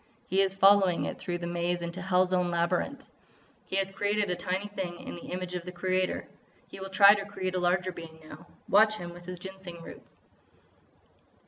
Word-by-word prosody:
He 190 +2 +2
is 195 0 +1
following 195 -2 +5
it - - -5
through 175 -1 -3
the 175 - -6
maze 175 0 -1
into 170 +2 -5
hell's 185 0 +2
own 180 -1 +2
labyrinth! 175 +11 -1 0.6
He - - -3
has 195 0 +1
created 205 0 0
a - - +2
tiny 185 +3 -2
thing 190 -4 -5
in - - -8
the 170 - -9
image 180 0 -4
of 180 -1 -4
the 180 - -7
Creator. 185 0 -1 0.4
He - - -11
will 190 0 -6
try 200 +1 +8
to 200 -2 -2
create 190 -2 -4
a 185 - 0
larger 180 +1 +1
being 165 -2 -10
now. 155 +2 -12 0.2
Watch 215 +2 +5
him 175 -4 -7
with 175 0 -13
his 180 0 -6
Ginseng 185 -2 -9
roots!" - - -13
185 Hz, 200 wpm, -29 LUFS, 175-195 Hz, 0.6 s, try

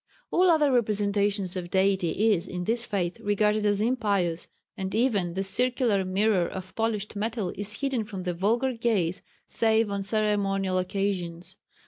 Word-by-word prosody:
All 365 +1 +4
other 305 -4 +4
representation 205 -3 +1
of 175 -2 -4
Deity 195 +2 +2
is 180 0 -2
in 180 -1 -4
this 230 +5 -1
faith 180 -3 -2
regarded 210 +1 +1
as 205 0 +1
impious, 200 -8 0 0.3
and 190 +1 -4
even 205 -8 +1
the 195 - -1
circular 240 -1 +1
mirror 190 -1 +1
of 185 0 -8
polished 220 -2 -2
metal 215 -2 -2
is 205 +5 -3
hidden 270 -5 0
from 200 -3 -7
the 180 -1 -2
vulgar 230 +9 +1
gaze 215 -7 0 0.2
save 220 -1 +2
on 200 0 -2
ceremonial 195 -2 0
occasions. 180 -2 -3
205 Hz, 150 wpm, -27 LUFS, 190-225 Hz, 0.3 s, All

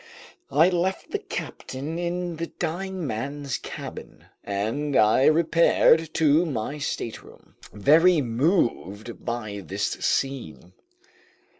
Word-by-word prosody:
I 155 +5 +5
left 185 +1 -1
the 415 - -1
captain 155 - -6
in 175 -1 -3
the 165 +1 -3
dying 180 +2 -4
man's 140 +3 -3
cabin - - -9 0.2
and 115 +9 -2
I 110 +5 +5
repaired 165 0 +4
to 155 0 +4
my 145 -2 -3
stateroom, 115 -5 -6 0.2
very 160 - +5
moved 120 - -1
by 110 -4 -4
this 80 - -2
scene. 135 -1 -2
145 Hz, 105 wpm, -25 LUFS, 120-170 Hz, 0.2 s, I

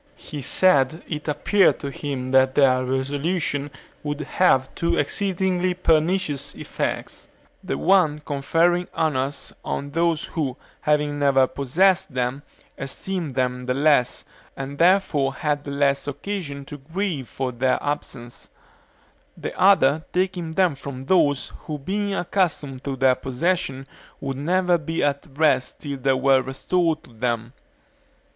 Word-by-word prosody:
He 150 -3 -8
said 155 0 +3
it 150 -1 -5
appeared 185 +7 +3
to 140 - -4
him 135 -3 -4
that 130 0 +4
their 130 -3 +4
resolution 145 +3 -1 0.3
would 145 0 -3
have 135 -4 +2
two 170 - 0
exceedingly 185 +2 0
pernicious 165 -2 +1
effects; - - -4 0.4
the 70 - -2
one 155 - +3
conferring 165 +5 +1
honors 140 -4 -1
on 140 0 -4
those 165 0 +1
who, 140 -6 -3 0.2
having 150 -1 +1
never 135 -2 +4
possessed 175 +5 +1
them, 125 +2 -1 0.4
esteemed 155 +2 -4
them 125 -1 -1
the 125 - 0
less, 145 -3 +2 0.3
and 135 +1 -6
therefore 165 -7 +3
had 150 -1 -1
the - - -5
less 140 0 +1
occasion 145 -3 -5
to 145 +1 -9
grieve 160 -2 -3
for 130 -1 -3
their 130 +1 +1
absence; 125 -4 -5 0.9
the - - -5
other 160 -6 +4
taking 180 -3 -1
them 180 -2 +3
from 135 -1 -8
those 145 -3 +2 0.2
who 150 - -3
being 200 +8 -2
accustomed 160 -8 -1
to 140 -1 -2
their 130 0 +4
possession 135 +1 -1 0.3
would 135 -1 -4
never 175 +4 +2
be 160 +2 -2
at 140 0 0
rest 150 -4 +1
till 140 -2 -4
they 135 +1 +2
were 135 0 +4
restored 160 +5 -1
to 120 - -17
them. 120 +1 -2
145 Hz, 135 wpm, -23 LUFS, 135-170 Hz, 0.9 s, that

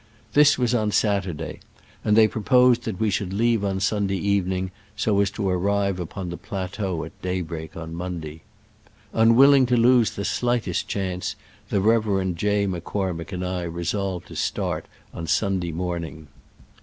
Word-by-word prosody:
This 145 0 +6
was 125 -1 +1
on 110 -3 +1
Saturday, 100 -5 -1 0.4
and 105 0 +3
they 110 -1 +7
proposed 125 +2 +3
that 105 -5 -4
we 110 -2 +1
should 95 0 -2
leave 115 0 +2
on 95 -1 -1
Sun 100 +1 +1
day 95 - -1
evening, 95 -2 0 0.2
so 100 -2 +2
as 100 - +2
to 100 0 -3
arrive 100 +1 +1
upon 90 +1 -5
the 85 - -5
plateau 95 -3 -4
at - - -10
daybreak 85 -4 -4
on 80 0 -6
Monday. 85 -3 -6 0.7
Un 115 +1 +5
willing 135 0 +7
to 125 0 +2
lose 120 -1 +4
the 100 - -3
slightest 120 -5 0
chance, 95 -2 -3 0.3
the 100 - +1
Rev. 100 -4 +2
J. 100 +4 +1
M'Cormick 90 -1 -3
and 90 -1 -3
I 90 0 -2
resolved 85 +2 -3
to - - -9
start - - -2 0.3
on 85 - -6
Sunday 95 -4 0
morning. 85 -2 -4
95 Hz, 160 wpm, -24 LUFS, 90-110 Hz, 0.7 s, they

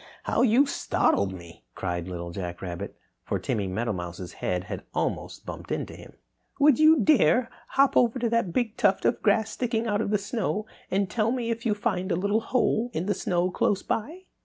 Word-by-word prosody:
how - - +1
you 250 +3 +5
startled 100 - +1
me!" 85 -6 -11
cried 90 -2 -3
Little 85 -1 -5
Jack 85 -1 -6
Rabbit, 85 -2 -6 0.3
for - - -1
Timmy 100 -3 -2
Meadowmouse's 95 -4 -4
head 90 0 -1
had - - -6
almost - - -2
bumped - - -8
into - - -3
him. - - -13 0.5
"Would 290 -2 +5
you 310 -2 +6
dare 235 - +4 0.2
hop 275 0 +3
over 240 0 +4
to 245 -1 0
that 230 -5 +1
big 225 +3 -1
tuft 200 -5 +2
of 235 - +2
grass 220 +1 +2
sticking 235 -2 -1
out 205 -2 0
of 225 - -1
the 210 - +3
snow 210 0 -2 0.2
and 195 +1 +1
tell 220 +3 0
me 240 -2 -1
if 230 +1 -3
you 210 - +2
find 200 -3 -1
a - - +2
little 200 +5 +1
hole 240 0 +1
in 165 - -1
the 205 - +1
snow 180 -1 0
close 195 +2 +1
by?" 310 +12 -3
205 Hz, 195 wpm, -26 LUFS, -, 0.5 s, you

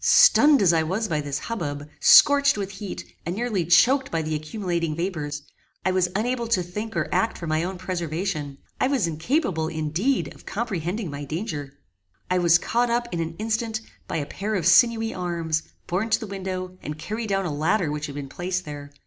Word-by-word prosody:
Stunned 290 -6 +6
as 175 -3 +5
I 165 - +3
was 190 +8 -1
by 155 -5 -1
this 145 -1 -3
hubbub, 145 -9 -4
scorched 280 -3 +7
with 200 -1 -3
heat, 195 0 -7 0.2
and 175 - -3
nearly 215 -6 -1
choaked 255 - +4
by 165 -1 -1
the 155 0 -3
accumulating 165 0 -2
vapours, 160 -4 -3 0.4
I 185 - +3
was 185 -1 +2
unable 235 +3 0
to 200 -6 +2
think 210 +6 -5
or - - 0
act 225 - +1
for 170 - -6
my 155 0 0
own 185 +1 -4
preservation; 170 -4 -3 0.2
I - - +3
was 270 -8 +1
incapable, 165 - 0
indeed, 165 - -1
of - - -17
comprehending 195 -3 -3
my 140 0 -6
danger. 150 -3 -4 0.6
I 180 - +3
was 170 -1 +5
caught 240 +7 0
up, 240 0 0
in 170 - -2
an 165 0 -3
instant, 220 0 -1 0.3
by - - -2
a 145 - -2
pair 205 +8 -3
of 175 -5 -1
sinewy 225 +3 +5
arms, 170 -3 -1 0.2
borne 195 +6 -1
to 220 - +3
the 225 - -5
window, 185 -2 -5
and 150 +1 -6
carried 215 +7 -4
down 195 -1 0
a 160 - -2
ladder 160 +3 +1
which 150 0 -3
had 140 - -8
been 145 -1 -5
placed 180 +4 -3
there. 145 -1 -8
180 Hz, 200 wpm, -24 LUFS, 160-220 Hz, 0.6 s, scorched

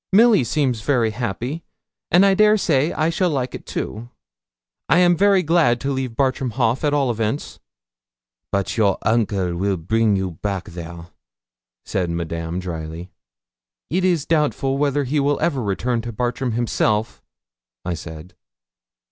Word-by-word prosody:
Milly 215 - +6
seems 125 -3 0
very 115 -2 +1
happy, 120 +7 -4 0.5
and 180 +3 +5
I 195 - +5
dare 215 +2 +5
say 155 -5 +1
I 155 +1 0
shall 180 +2 +1
like 130 -5 -2
it - - -9
too. 115 +3 -5 0.8
I - - +5
am 175 -1 +5
very 195 +1 +4
glad 155 -7 +3
to 140 - -1
leave 130 -3 -3
Bartram 130 -1 0
Haugh, 120 0 +1
at 150 - +2
all 140 -4 +1
events.' 115 +4 -3 0.9
'But 100 +3 -1
your 100 -4 +3
uncle 100 -6 0
weel 95 +2 0
bring 110 +5 +1
you 95 -1 -2
back 100 -3 -3
there,' 85 0 -9 0.8
said 90 -3 -1
Madame, 85 0 -3
drily. 85 0 -6 0.8
'It 180 +3 +1
is 175 -5 +1
doubtful 150 -4 0
whether 145 0 +1
he 140 +3 0
will 140 0 +1
ever 140 -6 0
return 115 +3 -1
to 120 +1 -6
Bartram 120 +1 -2
himself,' 110 -1 0 0.6
I 90 - -1
said. 80 +1 -9
120 Hz, 150 wpm, -21 LUFS, 100-145 Hz, 0.9 s, Milly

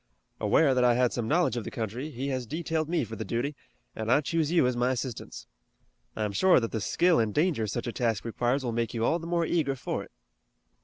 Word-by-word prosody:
Aware 145 -4 +4
that 125 -1 +2
I 120 -1 +5
had 125 0 +2
some 120 -3 -2
knowledge 150 -4 +2
of 120 - -2
the - - -5
country, 120 +3 -4
he 135 0 -4
has 130 -3 -3
detailed 160 +2 -2
me 170 -4 +1
for 110 -1 -6
the 110 - -4
duty, 125 +6 -2 0.4
and 110 +1 -2
I 145 - +5
choose 160 +1 0
you 170 -6 +4
as 125 0 +1
my 120 +1 +1
assistants. 130 -2 -4 0.7
I'm 105 -2 -1
sure 185 - +5
that 115 -2 -3
the 110 - -2
skill 175 - +3
and 110 -2 +1
danger 150 - +1
such 115 +4 -3
a 120 - -3
task 115 -4 -1
requires 120 +4 0
will 120 - -1
make 115 0 -2
you 115 0 0
all 165 - +2
the 165 - -7
more 170 -1 +1
eager 155 -5 0
for 125 - -3
it." - - -16
125 Hz, 240 wpm, -28 LUFS, 115-155 Hz, 0.7 s, I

